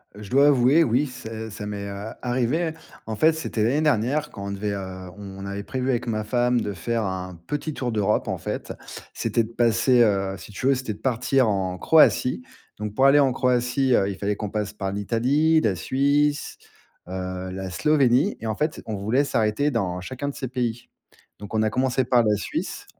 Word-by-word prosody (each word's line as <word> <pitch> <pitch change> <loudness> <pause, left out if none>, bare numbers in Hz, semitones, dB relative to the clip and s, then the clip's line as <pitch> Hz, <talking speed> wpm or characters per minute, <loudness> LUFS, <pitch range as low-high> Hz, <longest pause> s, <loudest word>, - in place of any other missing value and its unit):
Heu, 105 - -10
je 100 - -10
dois 140 +3 +5
avouer, 140 +3 +5
oui, 130 +1 +2
ça 110 -3 -7
ça 105 +1 -7
m'est 100 -1 -5
a 100 +2 -7
arrivé. 130 +7 0 0.3
En 110 - -4
fait, 160 +9 +4
c'était 155 -8 -2
l'année 130 +7 +2
dernière 145 +1 +1
quand 100 0 -7
on - - -3
devait 100 +1 -3
heu, 95 -2 -6
on 95 -1 -8
avait 100 +1 -5
prévu 130 +4 -3
avec 125 -1 0
ma 110 -2 -1
femme 120 +2 +1
de 105 - -3
faire 115 +6 -2
un 95 -1 -4
petit 150 +1 -3
tour 125 -3 -3
d'Europe 105 -1 +1
en - - -2
fait. - - -5 0.4
C'était 115 - 0
de 110 - -9
passer 120 +2 +3
heu, 100 -3 +2
si 105 - -12
tu 105 - -5
veux, 135 - +5
c'était 130 -4 -4
de - - -14
partir 130 0 +1
en 95 -3 -1
Croatie. 155 - +4 0.4
Donc 105 -1 -5
pour 135 - +4
aller 140 +2 +7
en 135 -2 +4
Croatie, 125 +1 +1
heu, 100 -4 +3
il 100 - -4
fallait 100 +1 -1
qu'on 105 0 -4
passe 105 0 -3
par 95 -2 -3
l'Italie, 130 +10 +2
la 105 -8 +1
Suisse, 140 - +1 0.5
heu, 95 0 -5
la 95 0 -5
Slovénie 135 - +3
et 115 - -5
en 110 - -1
fait, 150 +6 -2
on 110 - -3
voulait 110 +8 +1
s'arrêter 125 +1 +1
dans 95 -8 -2
chacun 130 +8 -5
de 140 - -7
ces 130 - -4
pays. 120 -2 -3 0.5
Donc, 105 +1 -9
on 110 - +2
a 110 - +2
commencé 130 +3 +1
par 120 -1 +3
la 105 -1 +3
Suisse. 100 - -4
115 Hz, 210 wpm, -24 LUFS, 100-130 Hz, 0.5 s, aller